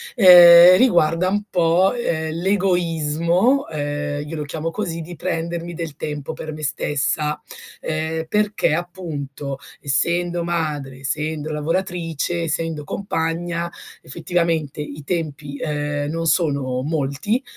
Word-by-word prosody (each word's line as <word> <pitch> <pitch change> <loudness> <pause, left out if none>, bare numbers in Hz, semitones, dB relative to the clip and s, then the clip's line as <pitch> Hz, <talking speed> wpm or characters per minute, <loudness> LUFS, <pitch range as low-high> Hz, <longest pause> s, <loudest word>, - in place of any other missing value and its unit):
Ehm, 175 -2 +9
riguarda 175 -7 +3
un 205 +2 0
po', 175 +3 +3
ehm, 160 -10 -2
l'egoismo, 180 - +1
ehm, 145 -1 -3
io 165 - -6
lo 150 - -3
chiamo 160 +2 -4
così, 170 -3 -3
di 175 +2 -8
prendermi 170 +1 -3
del 165 -3 -6
tempo 150 -3 -5
per 155 - -7
me 155 0 -8
stessa, 150 0 0 0.4
ehm, 160 +1 -3
perché 210 -4 +1
appunto, 150 -6 -5 0.2
essendo 170 +4 +1
madre, 150 -6 -3
essendo 150 +3 -3
lavoratrice, 170 +1 -2
essendo 160 -1 -2
compagna, 170 -1 -2 0.3
effettivamente 160 0 -1
i 150 0 -7
tempi, 150 -3 -4
ehm, 145 -1 -2
non 165 +1 -3
sono 140 -6 +1
molti, 155 - -1
165 Hz, 115 wpm, -21 LUFS, 150-175 Hz, 0.4 s, Ehm